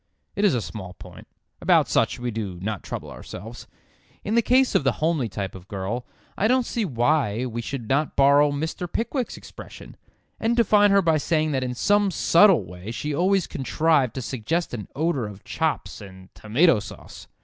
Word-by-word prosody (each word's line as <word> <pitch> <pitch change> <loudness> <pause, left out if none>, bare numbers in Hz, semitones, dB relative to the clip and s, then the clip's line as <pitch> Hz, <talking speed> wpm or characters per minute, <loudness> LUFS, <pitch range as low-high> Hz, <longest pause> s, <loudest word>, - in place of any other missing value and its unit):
It 200 - -1
is 200 -9 +4
a 115 - -1
small 95 -4 -8
point; 90 0 -13 0.3
about - - +4
such - - +1
we 120 0 -3
do 105 -5 -5
not 105 0 -4
trouble - - -7
ourselves. 115 +5 -10 0.6
In 210 - -2
the 235 - +4
case 255 +3 +3
of - - +2
the 135 - +2
homely 155 -7 0
type 95 -1 -5
of 95 0 -12
girl 100 +6 -4 0.3
I 210 - +1
don't 255 +1 +2
see 230 -2 -2
why 125 - +1
we 120 -1 -4
should 120 -1 -5
not 140 +4 0
borrow 140 +1 +5
Mr. 160 +4 -4
Pickwick's 245 +2 -2
expression, - - -12 0.4
and 230 +2 0
define 210 -3 +5
her 200 0 +4
by 160 -2 +3
saying 155 +1 0
that 130 -2 0
in 125 -1 -3
some 205 +8 +2
subtle 180 - +5
way 90 +4 -9
she 145 +6 -4
always 185 +4 +2
contrived 140 -3 +1
to 130 - -4
suggest 140 +9 -2
an 105 -5 -5
odour 145 -6 0
of 100 -1 -11
chops - - -3
and 95 -1 -13
tomato 125 +5 +3
sauce. 100 - -11
140 Hz, 185 wpm, -24 LUFS, 110-175 Hz, 0.6 s, borrow